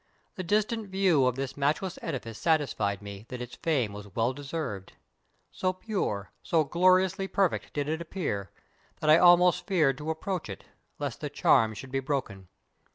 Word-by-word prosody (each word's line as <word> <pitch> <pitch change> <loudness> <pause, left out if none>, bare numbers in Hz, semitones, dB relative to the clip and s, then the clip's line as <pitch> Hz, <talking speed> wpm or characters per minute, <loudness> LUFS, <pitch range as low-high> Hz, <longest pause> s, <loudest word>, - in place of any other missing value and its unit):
The 190 - -5
distant 210 +3 0
\ - - -16
iew 175 -9 +4
of 125 - +1
this 135 0 -4
matchless 150 +6 -1
edifice 115 -8 -5
satisfied 110 - 0
me 100 +2 -9
that 125 - -6
its 125 0 -7
fame 135 -11 0
was 100 -2 -10
well 115 +3 +1
deser\'ed. 135 - -5 0.6
So 185 0 -1
pure, 185 - -3
so 160 -2 +2
gloriously 185 +4 +3
per 195 0 +3
fect - - -6
did 145 -1 -2
it 160 +2 -2
appear, 150 - -3 0.5
that 155 - +3
I 160 - +8
almost 175 0 +5
feared 150 -8 +2
to 150 +1 -5
approach 165 - -3
it, 95 - -8 0.3
lest - - -4
the - - -3
charm 110 -1 +3
should 130 +4 -9
be 135 - 0
broken. 130 -9 -3
145 Hz, 175 wpm, -28 LUFS, 115-180 Hz, 0.6 s, I